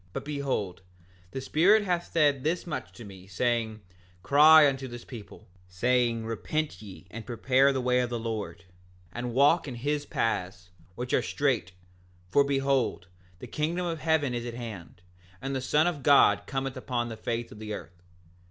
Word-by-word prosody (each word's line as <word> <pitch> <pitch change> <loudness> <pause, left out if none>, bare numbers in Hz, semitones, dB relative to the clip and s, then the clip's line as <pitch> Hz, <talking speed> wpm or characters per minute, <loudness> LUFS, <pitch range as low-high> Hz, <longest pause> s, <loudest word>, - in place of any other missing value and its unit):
7:9 90 - -31
But - - -5
behold, 140 -11 -3 0.5
the 130 - -5
Spirit 190 +10 +4
hath 175 -3 -2
said 145 -5 +2
this 170 +3 -1
much 170 - -4
unto 120 - -13
me, 95 -2 -12
saying: 110 +1 -1 0.4
Cry 150 +3 +7
unto 135 -1 -2
this 120 -1 -9
people, 115 -6 -11 0.2
saying—Repent 115 +8 -1
ye, 95 -3 -11
and 115 0 -7
prepare 130 +4 +2
the 135 -1 -1
way 125 0 +2
of 125 -1 0
the 120 - -2
Lord, 110 -4 -5 0.5
and 120 +4 -4
walk 150 +5 +4
in 130 - -5
his 145 +4 -2
paths, 90 -4 -2 0.2
which 125 +2 -5
are - - +4
straight; 125 -10 -1 0.6
for 140 - +5
behold, 135 -8 0 0.3
the - - -9
kingdom 170 +4 -2
of 165 -2 -3
heaven 155 -5 +1
is 120 -1 -3
at 120 - -6
hand, 105 -7 -9 0.4
and 135 0 -4
the 130 - -2
Son 150 +4 +2
of 175 -5 -1
God 140 +1 +5
cometh 135 -1 -3
upon 125 -2 -3
the 115 - -6
face 115 +1 -4
of 105 - -11
the 110 0 -7
earth. 90 -3 -8
125 Hz, 175 wpm, -28 LUFS, 115-145 Hz, 0.6 s, Cry